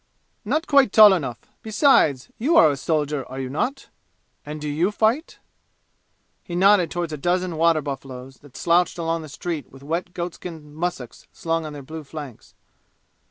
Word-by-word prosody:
"Not 315 +2 -1
quite 275 -6 +4
tall 215 -2 +8
enough. 135 -10 -2 0.2
Besides 215 - +3
you 285 +9 +2
are 155 -2 +7
a - - -2
soldier, 150 0 -1
are 130 +1 -7
you 130 -1 -4
not? 245 - -3 0.5
And 150 +1 -7
do 150 - -5
you 155 +6 +1
fight?" 225 +9 0 1.1
He 175 - -6
nodded 190 -1 +4
toward 175 -2 -3
a - - -4
dozen 175 +3 -1
water 165 0 +3
buffaloes, 135 -2 -7
that 145 -3 -15
slouched 175 +1 +2
along 165 -1 -2
the 155 - -10
street 160 +1 -5
with 135 +1 -15
wet 170 +4 -4
goatskin 170 -3 -7
mussuks 155 -7 -5
slung 165 -1 -2
on 150 - -8
their 145 -1 -9
blue 155 +3 -8
flanks. 145 -4 -10
165 Hz, 165 wpm, -23 LUFS, 145-180 Hz, 1.1 s, tall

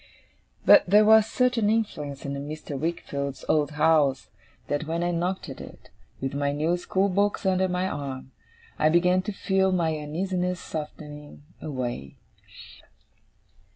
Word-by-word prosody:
But - - +8
there 210 +2 +6
was 220 0 +6
such 250 +1 +1
an 210 -2 +2
influence 150 -11 -2
in 140 - -3
Mr. 145 +1 -6
Wickfield's 140 -2 -4
old 150 -1 +1
house, 150 -3 +2 0.4
that 145 +2 -2
when 165 +1 -1
I 175 - 0
knocked 180 +2 -2
at - - -8
it, - - -13 0.3
with 135 0 -3
my 140 0 0
new 155 +4 0
school 190 +2 0
books 200 +2 0
under 190 0 +2
my 180 +1 -1
arm, 135 -5 -5 0.5
I 155 - +4
began 180 +3 +3
to 210 - -4
feel 190 -1 +1
my 165 -3 +1
uneasiness 180 +4 -2
softening 150 -1 -8 0.2
away. 120 - -5
160 Hz, 145 wpm, -26 LUFS, 145-185 Hz, 0.5 s, But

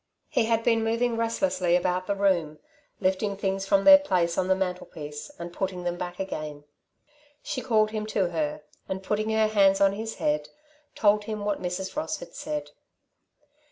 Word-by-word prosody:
He - - +2
had 230 0 +1
been 225 -1 +3
moving 230 +1 +1
restlessly 230 -6 +1
about 180 +1 0
the 200 - 0
room, 175 -6 +1 0.4
lifting 195 +1 0
things 195 0 -2
from 195 0 +3
their 285 +4 +10
place 180 -10 +1
on 185 - 0
the 190 - +4
mantelpiece 180 - -5
and 170 0 -7
putting 185 -1 -3
them 175 0 -1
back 175 0 -6
again. 155 -6 -5 0.8
She 295 -4 -3
called 215 -4 +2
him 215 -1 -3
to 195 -4 0
her 155 -2 -2 0.3
and, 190 0 -3
putting 215 +2 -1
her 220 0 +3
hands 195 -2 +4
on 195 0 +4
his 220 +2 -5
head, 150 0 -1 0.5
told 210 0 +3
him 215 -1 -4
what 205 -1 -1
Mrs. 185 +1 -4
Ross 305 +2 -2
had - - -11
said. 300 -1 -5
195 Hz, 175 wpm, -26 LUFS, 180-220 Hz, 0.8 s, their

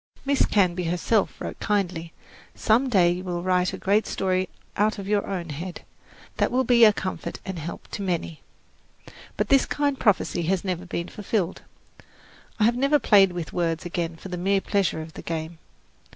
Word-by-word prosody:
Miss 280 0 +2
Canby 180 -3 +2
herself 180 +5 0
wrote - - -6
kindly, 180 -6 -1 0.4
"Some 240 +5 +2
day 180 -7 +4
you 180 +1 -3
will 175 -2 -3
write 180 0 +2
a - - -6
great 205 +3 +1
story 185 -1 0 0.3
out 215 +2 +1
of 195 -1 -6
your 205 0 +1
own 175 -4 -4
head, 170 +5 -6 0.6
that - - +2
will 255 +2 +2
be 240 -1 +5
a 215 - +7
comfort 190 -2 -5
and 190 -3 -5
help 165 +2 -7
to - - -5
many." 170 -4 -3 1.0
But - - -1
this 275 -1 +4
kind 285 -2 0
prophecy 200 -4 +2
has 185 +1 0
never 185 -2 -3
been 170 -1 -3
fulfilled. 200 -3 -2 1.0
I - - +3
have 235 +2 +4
never 275 +4 +3
played 200 -7 +5
with 175 -3 -6
words 170 -2 -1
again 170 -1 -3
for 190 - -10
the 180 - -4
mere 195 +3 +2
pleasure 195 -5 0
of 160 0 -12
the - - -8
game. 160 0 -5
185 Hz, 180 wpm, -25 LUFS, 175-210 Hz, 1.0 s, a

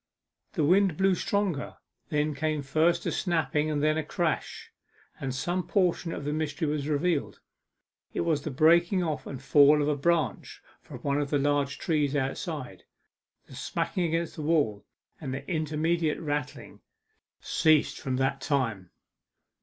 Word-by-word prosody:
The - - 0
wind 185 +1 +3
blew 190 0 +3
stronger; 185 -4 -1 0.3
there 150 0 0
came 155 0 -1
first 160 +5 +1
a - - 0
snapping, 150 -3 0
then 155 +1 +2
a - - -2
crash, 160 +1 -3 0.5
and 135 - -3
some 175 +8 -2
portion 180 -3 +1
of 145 - -5
the 145 - -1
mystery 155 +1 -2
was 145 -1 -2
revealed. 155 +1 0 0.7
It - - -2
was 160 -4 +1
the 155 - -4
breaking 170 +6 +4
off 155 -3 -3
and 135 - -6
fall 145 +2 +5
of 145 - +1
a 150 - +2
branch 165 +3 -1 0.2
from - - -11
one 140 +1 0
of 140 - -3
the 145 - +2
large 145 0 0
trees 150 -4 0
outside. 135 - -4 0.6
The - - -15
smacking 180 - -2
against 165 0 -2
the - - -4
wall, 145 -10 0 0.3
and 135 -4 -4
the 135 - -7
intermediate 160 -1 0
rattling, 145 -3 -4 0.6
ceased 155 -2 +2
from 130 -1 -2
that 135 +1 0
time. 115 - -1
150 Hz, 155 wpm, -28 LUFS, 140-165 Hz, 0.7 s, fall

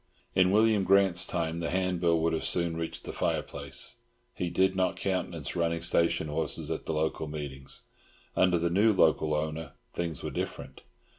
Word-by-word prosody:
In 90 -1 +4
William 105 0 +3
Grant's 95 -2 +4
time 85 -1 -2
the 85 - -2
handbill 90 -3 +1
would 80 0 +1
have 80 - -1
soon 85 -2 +4
reached 80 0 -5
the - - -7
fire - - 0
place; - - -5 0.4
he 90 - -3
did 95 +2 +2
not 95 -1 +1
countenance 90 -7 -3
running 85 -1 0
station 85 -1 +2
horses 75 - -1
at - - -4
the - - -1
local 80 0 -1
meetings. 70 -3 -7 0.5
Under 90 -1 +3
the 85 0 0
new 105 +4 +4
owner 80 0 +1 0.2
things 85 -4 -4
were - - -4
different. - - -5
85 Hz, 165 wpm, -29 LUFS, 80-95 Hz, 0.5 s, In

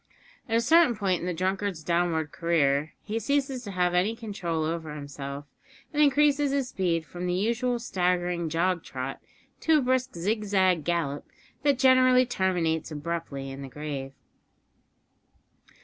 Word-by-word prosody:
At 225 - +3
a - - +3
certain 320 -2 +5
point 195 -4 0
in 175 - -4
the 180 - -1
drunkard's 185 -1 -2
downward 170 -2 0
career 155 -3 +1
he 220 +1 -2
ceases 275 -1 -1
to 205 - -7
have 180 -1 +1
any 190 +6 +2
control 195 -8 -3
over 160 -1 -3
himself, 140 -1 -7 0.5
and 300 - +2
increases 290 0 +4
his 275 -3 0
speed 170 -4 -1
from 180 +3 -5
the 180 - 0
usual 235 +5 0
staggering 180 -6 0
jog 170 +2 0
trot 130 +1 -6 0.4
to 320 -1 +4
a - - +2
brisk 255 -1 0
zigzag 190 -2 +1
gallop 165 -5 -1 0.4
that 285 -2 +2
generally 255 -1 +5
terminates 180 -8 0
abruptly 150 -3 -4
in 135 +1 -8
the 135 - -7
grave. 140 -1 -5
180 Hz, 150 wpm, -27 LUFS, 160-235 Hz, 0.5 s, certain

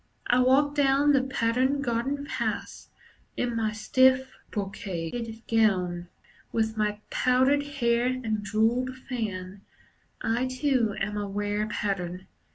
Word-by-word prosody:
I 245 - +3
walk 270 +3 +4
down 285 0 +4
the 275 -2 +4
patterned 260 +2 +1
garden 265 +4 -1
paths - - -4 0.5
In 240 -1 -1
my 220 -1 0
stiff, 260 +4 +3 0.2
brocaded 205 +3 -4
gown. 180 -6 +1 0.4
With 220 -1 0
my 210 -1 -1
powdered 260 +3 +3
hair 245 -4 +1
and 230 -5 -2
jewelled 230 +5 +1
fan, 200 -6 -4 0.6
I 235 +3 0
too 255 -5 +1
am 205 +1 -2
a 205 -1 -2
rare 205 +1 -1
Pattern. 190 -3 -3
230 Hz, 120 wpm, -27 LUFS, 210-260 Hz, 0.6 s, walk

